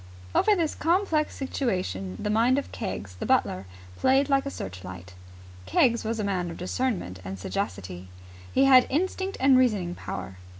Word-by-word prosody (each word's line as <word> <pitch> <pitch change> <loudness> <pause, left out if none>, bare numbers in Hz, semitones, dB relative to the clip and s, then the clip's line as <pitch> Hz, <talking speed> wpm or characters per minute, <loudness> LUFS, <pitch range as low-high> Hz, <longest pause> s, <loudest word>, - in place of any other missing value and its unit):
Over 425 - +4
this 330 -5 0
complex 330 -2 +1
situation 180 - -2
the 210 - -2
mind 235 +5 +3
of 280 - -3
Keggs, 105 - -5
the - - -3
butler, 95 +1 +1 0.3
played 270 +2 +3
like 275 0 +2
a - - -1
searchlight. 90 - -8 0.5
Keggs 235 - +3
was 225 +1 -2
a - - 0
man 185 -3 -1
of 165 - -7
discernment 185 - -2
and 95 +1 -6
sagacity. 95 - -4 0.4
He 270 - +4
had 260 -2 +7
instinct 375 +5 -1
and 265 -1 +6
reasoning 205 -9 +1
power. 95 - -6
220 Hz, 160 wpm, -27 LUFS, -, 0.5 s, had